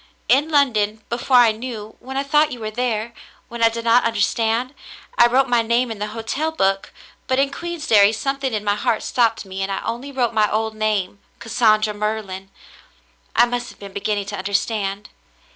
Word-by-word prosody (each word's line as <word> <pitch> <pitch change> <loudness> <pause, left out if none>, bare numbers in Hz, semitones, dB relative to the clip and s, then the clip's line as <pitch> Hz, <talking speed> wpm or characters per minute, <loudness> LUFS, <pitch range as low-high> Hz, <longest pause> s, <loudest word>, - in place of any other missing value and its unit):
In 290 +4 +3
London, 220 -8 +1
before 245 +2 +2
I 240 -2 +6
knew, 220 -1 -7
when 265 +1 -7
I 275 - 0
thought 300 +2 +3
you 250 - -6
were 215 -1 -4
there, 235 -1 -2 0.4
when 235 0 -7
I 230 - +6
did 230 0 -6
not 235 +2 +5
understand, 230 +3 0 0.4
I 240 - +6
wrote 260 +3 +2
my 240 -1 +3
name 235 +2 +1
in 220 - -6
the 210 - -2
hotel 230 +9 -3
book, 195 -10 0 0.4
but 260 - +1
in 275 +1 +2
Queensderry 290 -11 +2
something 270 +4 -2
in 215 -2 -2
my 205 -1 +1
heart 220 +1 -1
stopped 230 -4 +1
me 190 0 -6
and 195 +1 -2
I 195 - -2
only 240 +5 -4
wrote 245 -4 0
my 215 -2 +2
old 220 +1 -1
name, 210 -3 -1 0.2
Cassandra 215 -2 +2
Merlin. 205 -2 -4 0.9
I 240 - +6
must 245 0 -3
have - - -14
been 200 -1 -10
beginning 205 0 -2
to 205 0 -5
understand." 200 0 -2
225 Hz, 190 wpm, -21 LUFS, 210-250 Hz, 0.9 s, I